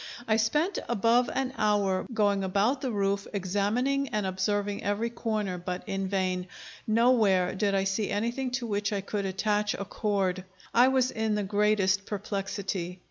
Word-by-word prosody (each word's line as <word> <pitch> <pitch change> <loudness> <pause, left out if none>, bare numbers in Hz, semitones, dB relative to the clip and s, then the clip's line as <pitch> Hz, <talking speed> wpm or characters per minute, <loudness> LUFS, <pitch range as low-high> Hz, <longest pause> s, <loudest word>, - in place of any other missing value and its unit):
I 220 - +3
spent 300 - +1
above 240 +2 +3
an 265 0 -2
hour 205 -3 +1
going 205 -3 +2
about 205 +8 +1
the 265 - -1
roof, 200 -2 0
examining 210 +9 0
and 210 -3 -1
observing 200 +2 -1
every 210 +3 -1
corner, 215 -6 -2
but 180 +1 -4
in 195 0 -2
vain; 185 -1 -1 0.4
nowhere 215 -5 +3
did 200 0 0
I 195 - +2
see 195 +2 -1
anything 235 +5 -1
to 245 - -5
which 205 -2 -1
I 200 -1 -1
could 200 0 -3
attach 210 +2 0
a 200 - -5
cord. 195 -3 -1 0.3
I 245 +2 +6
was 260 -1 +2
in 220 -1 -1
the 210 - 0
greatest 205 -1 +2
perplexity. 195 -3 -3
205 Hz, 160 wpm, -28 LUFS, 195-225 Hz, 0.4 s, I